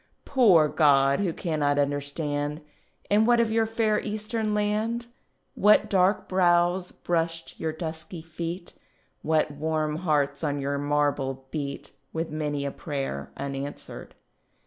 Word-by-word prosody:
Poor 200 Hz, -, +5 dB
God, 140 Hz, -2 st, +4 dB
who 195 Hz, -4 st, +1 dB
cannot 150 Hz, -4 st, 0 dB
understand, 145 Hz, +1 st, -1 dB, 0.5 s
And 215 Hz, +2 st, +4 dB
what 240 Hz, -1 st, +5 dB
of 230 Hz, -1 st, +2 dB
your 225 Hz, 0 st, +2 dB
fair 220 Hz, -1 st, +1 dB
Eastern 215 Hz, 0 st, -2 dB
land, 215 Hz, +3 st, 0 dB, 0.5 s
What 210 Hz, +1 st, +4 dB
dark 190 Hz, +1 st, +3 dB
brows 175 Hz, 0 st, +2 dB
brushed 165 Hz, -1 st, -2 dB
your 160 Hz, -, -1 dB
dusky 160 Hz, +1 st, -6 dB
feet, 170 Hz, +2 st, -6 dB, 0.5 s
What 155 Hz, -1 st, +1 dB
warm 155 Hz, +1 st, -1 dB
hearts 145 Hz, -4 st, 0 dB
on 145 Hz, -2 st, 0 dB
your 140 Hz, +1 st, -1 dB
marble 145 Hz, -2 st, 0 dB
beat, 140 Hz, -3 st, -5 dB, 0.2 s
With 165 Hz, 0 st, -3 dB
many 150 Hz, -2 st, -2 dB
a 140 Hz, -, -2 dB
prayer 135 Hz, -, -4 dB
unanswered?" 140 Hz, +1 st, -6 dB
160 Hz, 125 wpm, -26 LUFS, 145-190 Hz, 0.5 s, Poor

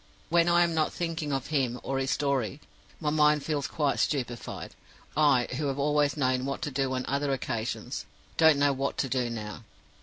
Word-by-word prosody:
When 170 Hz, +1 st, +4 dB
I 175 Hz, 0 st, +5 dB
am 170 Hz, -1 st, 0 dB
not 155 Hz, -1 st, +1 dB
thinking 165 Hz, -3 st, -3 dB
of 135 Hz, -2 st, -2 dB
him 125 Hz, -4 st, +1 dB
or 135 Hz, -, -2 dB
of -, -, 0 dB
his 135 Hz, -, -1 dB
story, 140 Hz, -2 st, 0 dB, 0.4 s
my 150 Hz, -2 st, 0 dB
mind 150 Hz, -1 st, +4 dB
feels 145 Hz, -3 st, -1 dB
quite 145 Hz, -4 st, 0 dB
stupefied. 125 Hz, -5 st, -2 dB, 0.4 s
I, 145 Hz, -5 st, +4 dB
who 150 Hz, 0 st, -1 dB
have 135 Hz, -1 st, -2 dB
always 145 Hz, +1 st, +2 dB
known 130 Hz, -2 st, +1 dB
what 135 Hz, +1 st, -3 dB
to 150 Hz, -, -2 dB
do 135 Hz, 0 st, 0 dB
on 130 Hz, -, -2 dB
other 140 Hz, +1 st, 0 dB
occasions, 115 Hz, -3 st, -3 dB, 0.3 s
don't 160 Hz, -2 st, +6 dB
know 145 Hz, 0 st, +3 dB
what 135 Hz, +1 st, -2 dB
to 135 Hz, -, 0 dB
do 125 Hz, -2 st, 0 dB
now. 110 Hz, -1 st, -6 dB
140 Hz, 195 wpm, -28 LUFS, 130-150 Hz, 0.4 s, don't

